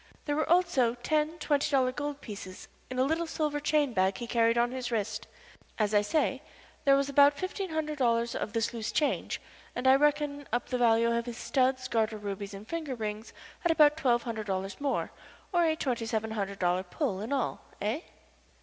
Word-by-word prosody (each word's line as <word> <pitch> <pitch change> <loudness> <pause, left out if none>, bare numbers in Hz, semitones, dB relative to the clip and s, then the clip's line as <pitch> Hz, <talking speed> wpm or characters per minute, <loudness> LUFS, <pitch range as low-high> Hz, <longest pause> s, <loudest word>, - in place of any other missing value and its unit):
There 290 - 0
were 310 - 0
also 325 -9 +3
ten 305 +6 0
twenty 295 -2 +1
dollar 260 -3 +3
gold 290 +1 -4
pieces 190 -3 -8 0.2
in 255 - -5
a 255 - +4
little 325 +4 0
silver 300 -2 -1
chain 290 -3 +1
bag 190 -1 +2
he 240 - -5
carried 230 0 +2
on 240 +1 +2
his 255 -1 -4
wrist. 220 0 -2 0.5
As 215 -1 +1
I 205 - +5
say, 270 +4 0 0.4
there 275 -1 +6
was 275 0 +1
about 285 +1 +5
fifteen 375 +1 -3
hundred 305 -2 -3
dollars 235 -2 +2
of 205 - -4
this 225 0 0
loose 225 -2 -3
change, 295 - 0 0.4
and 250 - -3
I 260 - +8
reckon 290 0 +1
up 240 +2 -1
the 250 - -1
value 235 0 +4
of 235 +1 -2
his 240 -1 -5
studs, 260 -1 +1
garter 220 -2 0
rubies, 200 -1 -5
and 200 +2 -10
finger 315 -6 -3
rings 215 -1 -5 0.3
at 345 - +2
about 300 -2 +6
twelve 245 -6 +2
hundred 220 -3 -4
dollars 195 +4 -3
more, 280 -1 -1 0.4
or 345 -1 +4
a 320 -1 +2
twenty 245 -7 -2
seven 220 0 -1
hundred 200 -2 -3
dollars 180 +1 +1
pull 215 - -2
in 220 - -5
all. 270 -4 -1 0.2
Eh?" 220 +10 -1
250 Hz, 200 wpm, -29 LUFS, 220-290 Hz, 0.5 s, I